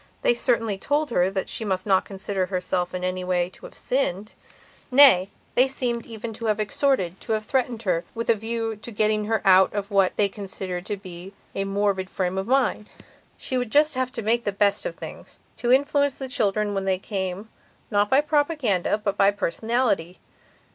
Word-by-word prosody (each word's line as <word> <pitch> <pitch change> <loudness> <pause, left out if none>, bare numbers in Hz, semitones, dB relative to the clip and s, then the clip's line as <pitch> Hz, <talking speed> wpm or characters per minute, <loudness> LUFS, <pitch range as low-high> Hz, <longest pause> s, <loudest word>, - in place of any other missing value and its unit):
They - - +4
certainly 230 -5 0
told 290 +3 0
her 180 -4 +2
that 195 -1 -3
she - - -5
must 190 -3 -2
not 190 -2 +3
consider 195 -1 -2
herself 185 -1 -2
in 180 - -4
any 185 0 -2
way 180 -1 0
to - - -12
have - - -18
sinned. 210 -6 -1 0.6
Nay, 255 -9 +7 0.2
they 255 +2 +4
seem 245 -3 -2
even 225 0 -6
to 230 +2 -7
have 215 -1 +1
extorted, 205 -4 0
to - - -2
have 215 0 -2
threatened 245 -3 -1
her, 175 -4 0
with 230 0 -3
a - - +6
view 225 +1 -3
to 215 +3 -10
getting 215 0 +1
her 220 0 0
out 190 0 +6
of 205 0 -3
what 195 -2 +3
they 205 - +3
considered 190 -2 -5
to 205 - -2
be 185 0 -10 0.2
a 195 - -2
morbid 195 -1 0
frame 185 0 -2
of 190 - -4
mind. 255 -5 +1 0.5
She 255 - -1
would 245 -3 -4
just 300 +3 +4
have 255 -1 -1
to 230 -4 -5
make 235 +3 +1
the 205 - -1
best 200 - +1
of - - -6
things, - - -10 0.2
to 240 - 0
influence 285 +1 +3
the 265 - -6
children 210 -5 0
when 195 -1 -2
they 190 -1 +1
came, 190 +1 -4 0.4
not 205 0 +2
by 270 +2 +5
propaganda, 290 - +1
but 210 -2 -3
by 195 - +5
personality. 205 -2 -1
210 Hz, 195 wpm, -24 LUFS, 190-240 Hz, 0.6 s, Nay